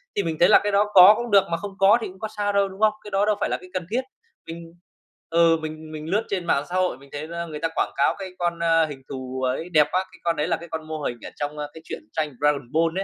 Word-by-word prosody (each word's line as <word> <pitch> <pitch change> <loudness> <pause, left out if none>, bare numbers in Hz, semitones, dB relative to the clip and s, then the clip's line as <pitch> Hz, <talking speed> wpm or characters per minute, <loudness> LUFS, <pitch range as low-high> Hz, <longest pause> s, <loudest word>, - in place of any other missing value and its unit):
thì 200 - +1
mình 160 -2 -3
thấy 175 - +6
là - - +8
cái 205 - 0
đó 205 +1 +2
có 185 +3 +10
cũng 240 -2 -4
được, 200 -1 +6
mà 165 - +1
không 200 +3 -6
có 200 +4 +6
thì - - -3
cũng 185 0 -13
có 220 - -3
sao 205 0 0
đâu, 200 0 +3
đúng 190 +1 -12
không? 215 -1 +4
Cái 210 - -10
đó 195 +1 +2
đâu 210 -1 +2
phải - - 0
là - - -1
cái 185 - -13
cần 185 -2 -3
thiết. 250 +3 +1 0.5
Mình 165 0 -9 0.6
ừ, 165 0 +4
mình 155 0 -7
mình 155 0 -7
lướt 210 +4 +1
trên 185 -3 -2
mạng 140 -4 +1
xã 180 - -4
hội 185 -8 +1
mình 140 +1 -17
thấy 150 +2 -6
ra 170 0 -5
người 155 -2 -7
ta 165 - 0
quảng - - 0
cáo - - +2
cái 190 -1 -6
con, 170 -1 -1
ơ, 165 -1 +3
hình 140 -3 -8
thù 130 -1 -6
ấy 145 +7 -2
đẹp 150 -3 +4
quá, 185 +1 0
cái - - -17
con 170 -1 +1
đấy 150 - -1
là 165 - 0
cái 170 0 -11
con 160 -1 -6
mô 155 -1 -5
hình 120 -4 -3
ở - - -6
trong, 145 +1 -4
ơ, 150 0 -4
cái 160 - -11
chuyện - - -7
tranh 155 -3 -2
Dragon 145 -4 +1
Ball 165 +3 +1
165 Hz, 310 wpm, -24 LUFS, 155-195 Hz, 0.6 s, có